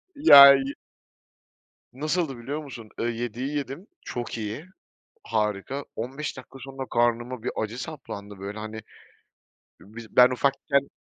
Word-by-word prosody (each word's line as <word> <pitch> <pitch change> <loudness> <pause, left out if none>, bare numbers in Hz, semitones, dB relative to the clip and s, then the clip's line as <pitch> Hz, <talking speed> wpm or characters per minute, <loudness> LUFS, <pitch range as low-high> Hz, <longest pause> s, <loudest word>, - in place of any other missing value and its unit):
Ya, 140 - +10
yi 135 0 -1 1.2
nasıldı 155 -1 -2
biliyor 140 +6 -5
musun? 120 -6 -10
Iıı, 120 - 0
7'yi 120 +5 -4
yedim, 145 +7 -6
çok 120 -1 -5
iyi, 110 +8 -5 0.6
harika. 105 - -2
15 135 +6 -5
dakika 130 +1 -12
sonra 135 +1 -7
karnıma 120 0 0
bir - - -2
acı 110 +3 -4
saplandı, 105 -10 -8
böyle, 100 +2 -6
hani, 110 +1 -7 1.0
biz 110 +2 -13
ben 125 +1 +8
ufakken 140 +2 0
125 Hz, 125 wpm, -25 LUFS, 115-140 Hz, 1.2 s, Ya